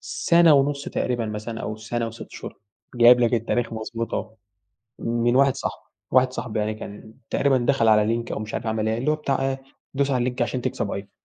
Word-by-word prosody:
سنة 170 -2 +4
ونُص 140 0 +1
تقريبًا 120 -2 -1
مثلًا 110 +2 -5
أو 110 - -4
سنة 115 +1 -3
و6 115 +1 -8
شهور، - - -9 0.4
جايب 120 0 +7
لك 120 0 +3
التاريخ 115 0 -1
مضبوط 115 +1 -4
أهو، 110 0 -4 0.7
من 120 +1 0
واحد 135 0 +4
صاحبي، - - -5 0.3
واحد 130 0 +4
صاحبي 120 -3 -3
يعني 105 +1 -1
كان 110 0 -10 0.2
تقريبًا 140 -2 +2
دخَل 120 -1 +2
على 105 -1 +5
لينك 115 +2 -1
أو - - -3
مش 110 0 -6
عارف 115 - -3
عمل 110 0 -1
إيه، 110 - 0
اللي 130 +6 +1
هو - - +1
بتاع 140 -3 -1
إيه، 135 0 -5 0.3
دوس 140 0 +1
على 130 - +2
اللينك 125 +1 -1
عشان 125 +1 -1
تكسب 100 - -2
آيفون. 100 0 -5
120 Hz, 210 wpm, -24 LUFS, 110-130 Hz, 0.7 s, جايب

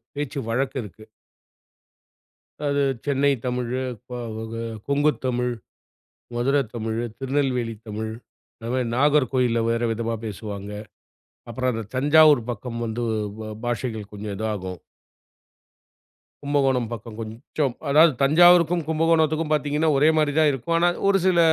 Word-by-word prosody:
பேச்சு 145 -1 -3
வழக்கு 130 +4 -1
இருக்கு. 105 +1 -12 1.6
அது, 145 0 +1 0.2
சென்னை 140 0 +2
தமிழு, 125 0 -2 0.3
க - - -7 0.2
வ - - -5 0.5
கொங்கு 145 +2 +3
தமிழ், 125 -1 0 0.8
மதுரை 135 +4 +2
தமிழு, 115 0 -2
திருநெல்வேலி 130 -4 -1
தமிழ், 110 +1 -4 0.4
இந்த 115 0 -8
மாரி 130 -1 0
நாகர்கோயில்ல, 130 -4 +2
வேற 115 0 0
விதமா 115 +1 -2
பேசுவாங்க. 100 -1 -6 0.8
அப்புறம் 130 +2 -1
அந்த 115 0 -3
தஞ்சாவூர், 150 0 +6
பக்கம் 115 +1 -6
வந்து 115 +2 -3 0.4
ப 110 - -6 0.2
பாஷைகள் 115 -3 -3
கொஞ்சம் 105 0 -5
இதாகும். 95 -4 -4 1.6
கும்பகோணம் 135 -5 +1
பக்கம் 115 -1 -7
கொஞ்சம் 120 +5 -3 0.2
அதாவது 155 +3 +6
தஞ்சாவூருக்கும், 175 +3 +5
கும்பகோணத்துக்கும் 160 -1 +2
பார்த்தீங்கன்னா 150 +1 +1
ஒரே 150 +3 +5
மாரிதான் 155 0 +3
இருக்கும். 135 +6 -2
ஆனா, 175 +1 +4 0.2
ஒரு 200 0 +5
சில 185 -2 +4
130 Hz, 115 wpm, -24 LUFS, 115-150 Hz, 1.6 s, தஞ்சாவூர்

